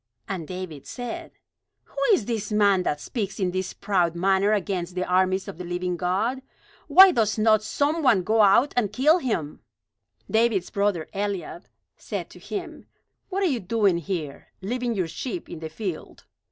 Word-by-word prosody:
And 180 -5 -4
David 180 -6 -7
said: 245 -2 -6 0.5
"Who - - -26
is 250 - +3
this 220 -2 -3
man 200 -3 +4
that 150 -4 -1
speaks 200 - -4
in 185 -2 0
this 185 0 -3
proud 180 -5 0
manner 195 +3 +2
against 185 -3 -1
the 185 0 -1
armies 185 +1 +1
of 160 - -8
the - - -4
living 180 +1 -2
God? 195 +9 -1 0.5
Why 380 0 +9
does 220 -6 +1
not 215 0 +4
some 290 +8 0
one 235 -10 +4
go 220 +4 +3
out 215 +8 +5
and 215 -5 +1
kill 300 +10 +4
him?" 170 - -3 0.7
David's 220 -4 +1
brother 200 -6 0
Eliab 195 -3 -4 0.3
said - - -6
to - - -13
him: 350 -6 -7 0.4
"What 395 0 -1
are - - +3
you 275 -9 +1
doing 195 -3 +1
here, 160 -5 -5
leaving 240 +4 -2
your 185 -4 -1
sheep 270 - -5
in 165 - -8
the 160 0 -6
field? 180 0 -6
200 Hz, 170 wpm, -25 LUFS, 180-230 Hz, 0.7 s, Why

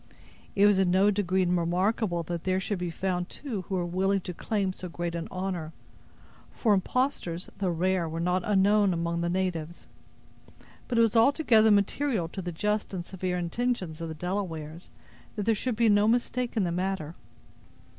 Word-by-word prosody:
It 200 - +5
was 205 -2 +5
in 190 -2 +3
no 190 +3 +4
degree 190 -2 +1
remarkable 180 +2 0
that 170 0 -4
there 185 0 +1
should 195 0 -3
be 180 -1 -2
found 180 +1 -2
two 240 -9 -5
who 190 +2 -4
were 180 -1 0
willing 190 +3 +1
to 180 - -6
claim 195 +1 -1
so 185 -1 -7
great 170 0 -4
an 170 -1 -4
honor, 180 -4 -4 0.8
for 220 -4 +2
impostors, 190 -4 -1
though 190 -2 0
rare, 175 0 0
were 165 +1 -4
not 180 +2 +1
unknown 205 0 +3
among 170 0 -1
the 170 - 0
natives; 175 -3 -2 1.0
but 240 - -1
it - - +6
was 230 0 +3
altogether 230 -3 +5
material 205 - +2
to 190 - -6
the 175 -1 -4
just 210 +4 -1
and 175 -2 -4
severe 185 -1 -3
intentions 180 -2 -2
of 165 - -4
the 160 - -5
Delawares, 170 -2 -4 0.5
that 210 - -2
there 225 - +4
should 235 +3 -2
be 230 +1 +3
no 205 0 +4
mistake 245 +1 0
in 210 - +3
the 175 - -1
matter. 180 -3 -2
185 Hz, 180 wpm, -28 LUFS, 175-210 Hz, 1.0 s, it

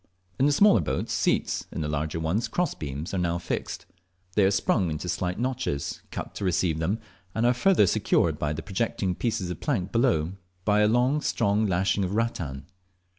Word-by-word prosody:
In 135 - +4
the - - +3
smaller 175 - +5
boats 75 - -2
seats, - - 0
in - - -4
the 75 - -1
larger 75 +2 -2
ones 80 +8 0
cross 175 -3 0
beams, 75 +4 -6
are 95 - 0
now 85 -1 0
fixed. 85 - -4 0.5
They 105 - +4
are - - +5
sprung 95 -2 +1
into 75 +3 -4
slight 90 +1 -2
notches 125 - -2
cut - - -6
to - - -6
receive 90 -3 +1
them, 95 +7 0 0.4
and 115 - +1
are 120 - +5
further 175 - +4
secured 90 - +2
to 75 0 -1
the 80 - -6
projecting 95 -2 -1
pieces 105 -3 -2
of 85 - -6
the - - -12
plank 95 +1 -1
below 110 - +2 0.3
by 105 0 +4
a 125 +7 +3
strong 105 -4 +1
lashing 95 +1 +1
of 95 +2 -2
rattan. 85 - -2
95 Hz, 190 wpm, -26 LUFS, 80-115 Hz, 0.5 s, smaller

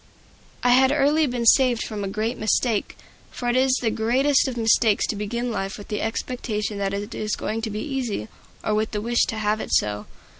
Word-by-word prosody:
I 245 - +3
had 260 +2 +5
early 295 +2 +3
been 245 -2 -2
saved 245 -1 +5
from 210 -2 -5
a - - -2
great 215 +5 -2
mistake; 220 0 0 0.3
for 245 - -4
it 240 - +1
is 260 0 +3
the 225 - +2
greatest 265 +7 +2
of 255 -2 -4
mistakes 225 -1 +3
to - - -3
begin 235 +4 -3
life 195 -2 -3
with 205 - -11
the 210 - -2
expectation 220 -2 -3
that 195 -1 -1
it 205 +3 -5
is 215 0 -2
going 220 +1 -3
to 225 - -3
be 210 0 -4
easy, 255 - -3 0.4
or 215 - 0
with 215 +1 -1
the 210 - -1
wish 235 +2 +2
to 220 - -4
have 215 0 0
it - - -6
so. 105 0 0
225 Hz, 215 wpm, -23 LUFS, 210-250 Hz, 0.4 s, had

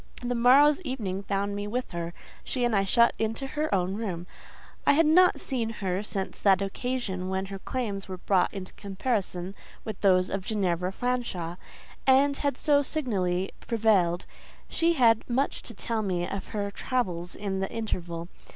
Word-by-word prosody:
The 245 0 0
morrow's 275 +6 +6
evening 220 - -3
found 200 0 -1
me 205 0 -3
with 245 +4 -3
her—she 170 +8 -4
and 240 -2 +1
I 195 - +3
shut 235 +5 +4
into 225 +4 -1
her 300 +3 -2
own 185 -1 +1
room. 190 -5 -3 0.6
I - - +5
had 325 +3 +4
not 360 +4 +5
seen 235 -4 -2
her 195 -4 -2
since 195 -2 -4
that 195 -2 +4
occasion 195 -2 -2
when 190 0 -1
her 195 0 -7
claims 205 -4 -3
were 185 -1 -5
brought 185 0 +2
into 190 -2 -7
comparison 195 -3 -2 0.3
with 215 -3 -6
those 185 -2 +4
of 195 -1 -2
Ginevra 185 -4 0
Fanshawe, 215 -8 -2 0.5
and 275 +2 +5
had 285 -3 -1
so 290 -1 +4
signally 195 - -1 0.2
prevailed; 200 -7 +2 0.4
she 335 +1 +2
had 230 -7 +4
much 265 +4 0
to 230 - -9
tell 225 +2 -2
me 180 -4 -1
of 195 - -5
her 200 -1 -3
travels 180 -7 -2
in 195 -2 -3
the 190 - -2
interval. 175 -7 -3
205 Hz, 165 wpm, -28 LUFS, 185-245 Hz, 0.6 s, morrow's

